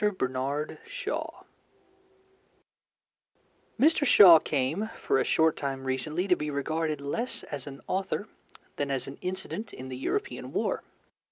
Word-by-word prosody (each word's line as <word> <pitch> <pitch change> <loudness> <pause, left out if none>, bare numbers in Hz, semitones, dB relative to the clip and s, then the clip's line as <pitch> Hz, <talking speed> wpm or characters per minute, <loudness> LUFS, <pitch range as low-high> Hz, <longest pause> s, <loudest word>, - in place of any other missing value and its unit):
BERNARD 135 +4 -2
SHAW - - -4 2.4
Mr. 305 +2 +4
Shaw 190 - +9
came 155 +10 -1
for 135 - +1
a - - +3
short 160 0 +3
time 135 -2 -3
recently 150 +8 -2
to 180 - +5
be 150 -2 -4
regarded 155 +1 -1
less 185 - -2
as 145 0 -6
an 135 -1 -9
author 195 +2 -2 0.5
than 145 -1 -1
as 135 -2 -1
an 135 - -9
incident 190 +4 -5
in 130 +1 -8
the 130 - -5
European 410 - -3
War. - - 0
150 Hz, 135 wpm, -28 LUFS, 135-190 Hz, 2.4 s, Shaw